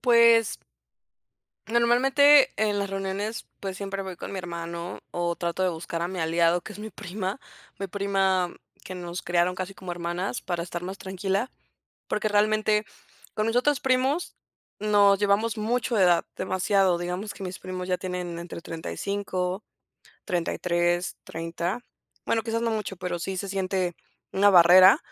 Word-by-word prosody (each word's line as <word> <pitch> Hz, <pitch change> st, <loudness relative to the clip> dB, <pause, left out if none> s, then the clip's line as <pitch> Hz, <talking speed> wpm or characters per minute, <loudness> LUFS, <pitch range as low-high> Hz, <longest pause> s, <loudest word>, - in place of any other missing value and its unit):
Pues 235 Hz, -2 st, +5 dB, 1.1 s
normalmente 265 Hz, +5 st, +5 dB
en 210 Hz, -1 st, +1 dB
las 200 Hz, -1 st, -1 dB
reuniones, 195 Hz, +3 st, -3 dB
pues 190 Hz, -1 st, -4 dB
siempre 195 Hz, 0 st, -4 dB
voy 190 Hz, -2 st, -7 dB
con -, -, -7 dB
mi 195 Hz, -, -4 dB
hermano 170 Hz, 0 st, -6 dB
o 175 Hz, -1 st, -1 dB
trato 170 Hz, +2 st, -2 dB
de 185 Hz, -, +3 dB
buscar 165 Hz, 0 st, -4 dB
a 170 Hz, -, -1 dB
mi 185 Hz, -1 st, -5 dB
aliado, 170 Hz, +2 st, +2 dB
que -, -, -9 dB
es 205 Hz, -, -11 dB
mi 215 Hz, +1 st, -6 dB
prima, 190 Hz, 0 st, -5 dB, 0.4 s
mi 195 Hz, -, -3 dB
prima 195 Hz, -2 st, +1 dB, 0.3 s
que 185 Hz, -, -7 dB
nos 175 Hz, 0 st, -5 dB
criaron 175 Hz, +1 st, +1 dB
casi 185 Hz, +1 st, -5 dB
como 185 Hz, -3 st, -7 dB
hermanas 175 Hz, +5 st, -3 dB
para 175 Hz, -2 st, -3 dB
estar 175 Hz, 0 st, -5 dB
más 190 Hz, +2 st, -5 dB
tranquila. 195 Hz, +5 st, -2 dB, 0.6 s
Porque 215 Hz, 0 st, 0 dB
realmente 215 Hz, 0 st, +2 dB, 0.5 s
con 215 Hz, +1 st, 0 dB
mis 225 Hz, -, 0 dB
otros 280 Hz, +3 st, +3 dB
primos 265 Hz, +5 st, +1 dB, 0.4 s
nos 205 Hz, -1 st, +5 dB
llevamos 210 Hz, +3 st, +2 dB
mucho 235 Hz, +2 st, 0 dB
de 195 Hz, -, +4 dB
edad, 175 Hz, -2 st, +4 dB
demasiado. 190 Hz, -1 st, +2 dB
Digamos 180 Hz, +4 st, -4 dB
que 195 Hz, -, -9 dB
mis 185 Hz, 0 st, -6 dB
primos 185 Hz, 0 st, -5 dB
ya 180 Hz, -, +1 dB
tienen 180 Hz, -2 st, -4 dB
entre 170 Hz, 0 st, -7 dB
35, 185 Hz, +3 st, -3 dB, 0.6 s
33, 175 Hz, -1 st, 0 dB
30. 170 Hz, +7 st, -4 dB, 0.4 s
Bueno, 225 Hz, -1 st, +1 dB
quizás 230 Hz, 0 st, -2 dB
no 230 Hz, -, +1 dB
mucho, 210 Hz, -3 st, -3 dB
pero 180 Hz, -1 st, -4 dB
sí 190 Hz, +2 st, -3 dB
se 195 Hz, +2 st, -4 dB
siente 190 Hz, -2 st, -1 dB, 0.4 s
una 205 Hz, +1 st, +5 dB
barrera 185 Hz, -, +8 dB
190 Hz, 160 wpm, -26 LUFS, 175-210 Hz, 1.1 s, barrera